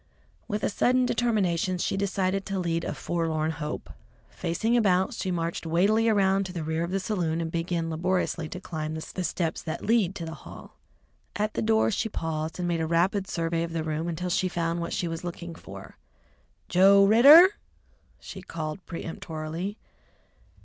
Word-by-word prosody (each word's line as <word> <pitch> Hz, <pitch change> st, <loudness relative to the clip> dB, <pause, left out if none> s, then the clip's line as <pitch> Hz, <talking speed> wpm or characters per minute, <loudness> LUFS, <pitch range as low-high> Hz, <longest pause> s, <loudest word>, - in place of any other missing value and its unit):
With 210 Hz, -2 st, -3 dB
a -, -, +2 dB
sudden 250 Hz, +4 st, +2 dB
determination 195 Hz, -7 st, +1 dB
she 175 Hz, -, -1 dB
decided 195 Hz, 0 st, 0 dB
to 195 Hz, 0 st, -2 dB
lead 170 Hz, -2 st, -1 dB
a -, -, -3 dB
forlorn 160 Hz, -2 st, -1 dB
hope. 150 Hz, -1 st, -5 dB, 0.4 s
Facing 225 Hz, +8 st, -1 dB
about, 190 Hz, -5 st, +2 dB
she 190 Hz, -, -3 dB
marched 170 Hz, -1 st, -2 dB
weightily 205 Hz, +7 st, +3 dB
around 195 Hz, -2 st, +2 dB
to 180 Hz, -, -9 dB
the 170 Hz, -3 st, -4 dB
rear 160 Hz, +1 st, -1 dB
of 170 Hz, -, -3 dB
the 195 Hz, +1 st, -1 dB
saloon 175 Hz, -5 st, -1 dB
and 165 Hz, -1 st, -3 dB
began 165 Hz, 0 st, -2 dB
laboriously 170 Hz, -1 st, -1 dB
to 185 Hz, -, -6 dB
climb 155 Hz, -4 st, -5 dB
the 160 Hz, -, -5 dB
steps 170 Hz, -1 st, -3 dB
that 160 Hz, -, -5 dB
lead 210 Hz, -4 st, +2 dB
to 170 Hz, -, -5 dB
the 165 Hz, -, -6 dB
hall. -, -, -12 dB, 0.6 s
At 210 Hz, +1 st, -1 dB
the -, -, -2 dB
door 220 Hz, 0 st, +3 dB
she 225 Hz, +2 st, -1 dB
paused 160 Hz, -4 st, -3 dB
and 180 Hz, -1 st, -2 dB
made 170 Hz, -1 st, 0 dB
a 160 Hz, -, -1 dB
rapid 185 Hz, +4 st, +1 dB
survey 165 Hz, -2 st, -1 dB
of 165 Hz, 0 st, -3 dB
the 165 Hz, -1 st, -1 dB
room 155 Hz, +1 st, -2 dB
until 175 Hz, +2 st, -3 dB
she 185 Hz, -, +1 dB
found 170 Hz, -1 st, -2 dB
what 170 Hz, -, -4 dB
she 175 Hz, -, -1 dB
was 165 Hz, +1 st, -5 dB
looking 170 Hz, -1 st, -6 dB
for. 100 Hz, -10 st, -11 dB, 0.7 s
"Joe 195 Hz, +2 st, +6 dB
Ridder!" 280 Hz, -, +9 dB, 0.7 s
she 190 Hz, -, -9 dB
called 160 Hz, -1 st, -6 dB
peremptorily. 165 Hz, +3 st, -5 dB
175 Hz, 175 wpm, -27 LUFS, 165-195 Hz, 0.7 s, Ridder